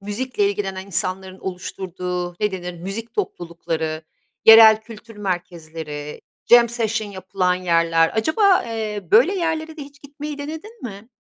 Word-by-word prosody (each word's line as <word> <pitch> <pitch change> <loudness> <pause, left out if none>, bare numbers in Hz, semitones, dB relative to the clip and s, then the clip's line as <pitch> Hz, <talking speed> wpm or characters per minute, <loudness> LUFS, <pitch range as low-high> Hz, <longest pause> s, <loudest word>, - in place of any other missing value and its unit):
müzikle 205 +1 -1
ilgilenen 195 -1 -4
insanların 190 0 -3
oluşturduğu 180 -1 -5
ne 210 - +1
denir 180 -1 -5
müzik 205 +5 -6
toplulukları, 165 - -3 0.4
yerel 220 -1 +9
kültür 225 0 -13
merkezleri, 160 -6 -5 0.3
jam 240 -1 +8
session 225 -2 -2
yapılan 185 -1 -1
yerler. 165 -2 +2
Acaba, 365 - +3
eee, 215 -5 -4
böyle 255 - +5
yerlere 320 -3 -2
de 300 - -7
hiç 285 +1 -14
gitmeyi 290 +1 -7
denedin 320 +11 -8
mi? 215 -1 -8
205 Hz, 130 wpm, -21 LUFS, 180-240 Hz, 0.4 s, yerel